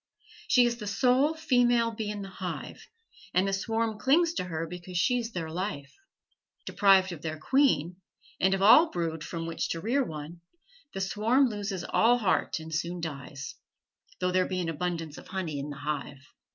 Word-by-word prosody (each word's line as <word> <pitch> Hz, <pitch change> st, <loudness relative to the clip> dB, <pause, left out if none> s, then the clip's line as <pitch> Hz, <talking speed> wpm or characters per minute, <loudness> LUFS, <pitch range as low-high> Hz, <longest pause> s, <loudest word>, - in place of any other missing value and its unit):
She 250 Hz, -2 st, +5 dB
is 235 Hz, 0 st, 0 dB
the 210 Hz, -3 st, -7 dB
sole 260 Hz, +8 st, +2 dB
female 245 Hz, -6 st, +2 dB
bee 220 Hz, -1 st, -4 dB
in 205 Hz, -1 st, -4 dB
the 195 Hz, -, -8 dB
hive, 185 Hz, -2 st, -7 dB, 0.5 s
and 185 Hz, +2 st, +3 dB
the 195 Hz, -, -1 dB
swarm 225 Hz, +2 st, -1 dB
clings 330 Hz, +5 st, +3 dB
to 185 Hz, -, -2 dB
her 165 Hz, -2 st, -3 dB
because 180 Hz, +1 st, -7 dB
she 245 Hz, +7 st, +2 dB
is 235 Hz, -1 st, -5 dB
their 165 Hz, -5 st, -4 dB
life. 170 Hz, -5 st, -4 dB, 0.7 s
Deprived 195 Hz, -2 st, +4 dB
of 165 Hz, -4 st, -8 dB
their 155 Hz, -1 st, -4 dB
queen, 180 Hz, -, +2 dB, 0.4 s
and 190 Hz, +1 st, +3 dB
of 195 Hz, -, -2 dB
all 300 Hz, +11 st, +8 dB
brood 165 Hz, -2 st, -3 dB
from 165 Hz, -1 st, -5 dB
which 165 Hz, -, -3 dB
to 165 Hz, -, -2 dB
rear 245 Hz, +10 st, +1 dB
one, 160 Hz, -2 st, -8 dB, 0.5 s
the 195 Hz, -, -3 dB
swarm 225 Hz, +7 st, +2 dB
loses 205 Hz, -4 st, -4 dB
all 240 Hz, +2 st, +3 dB
heart 210 Hz, -6 st, 0 dB
and 160 Hz, 0 st, -8 dB
soon 175 Hz, +2 st, -2 dB
dies, 140 Hz, -5 st, -6 dB, 0.7 s
though 180 Hz, 0 st, 0 dB
there 185 Hz, 0 st, +2 dB
be 185 Hz, -, -2 dB
an 170 Hz, -2 st, -2 dB
abundance 165 Hz, -1 st, -3 dB
of -, -, -14 dB
honey 175 Hz, -7 st, -4 dB
in 140 Hz, +2 st, -5 dB
the 145 Hz, -, -7 dB
hive. 145 Hz, -1 st, -5 dB
185 Hz, 185 wpm, -28 LUFS, 165-230 Hz, 0.7 s, all